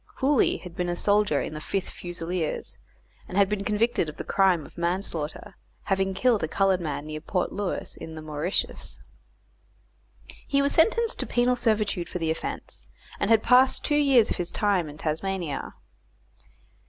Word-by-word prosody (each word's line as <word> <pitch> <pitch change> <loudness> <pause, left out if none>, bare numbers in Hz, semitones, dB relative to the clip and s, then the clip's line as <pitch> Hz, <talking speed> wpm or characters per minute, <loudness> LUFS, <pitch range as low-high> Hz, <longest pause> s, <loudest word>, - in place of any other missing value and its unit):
Hooley 275 -1 +2
had 180 -2 -11
been 175 0 -1
a 175 - -1
soldier 205 -5 +2
in - - -5
the 155 - -6
Fifth 195 +4 -3
Fusiliers, 175 -1 -4 0.5
and 185 - -5
had 200 -1 +5
been 205 0 -2
convicted 210 -4 +1
of 150 - -10
the - - -4
crime 185 -6 +2
of - - -15
manslaughter, 170 -3 -3 0.3
having 195 -1 0
killed 235 0 +2
a - - 0
coloured 190 +2 +2
man 150 -2 -4
near 155 0 -6
Port 180 +3 -1
Louis, 205 -2 -3
in 160 - -8
the 155 - -7
Mauritius. 155 +4 -2 1.5
He 280 - +2
was 280 0 +3
sentenced 455 +7 +3
to - - +1
penal 245 +1 +2
servitude 210 -7 0
for - - -4
the 165 -2 -1
offence, 160 - -5 0.3
and - - 0
had 225 -1 +5
passed 255 +2 +4
two - - +1
years 275 -6 +4
of - - -1
his 175 -1 -2
time 195 -7 +1
in 145 - -11
Tasmania. 160 -1 -3
190 Hz, 170 wpm, -26 LUFS, 165-215 Hz, 1.5 s, had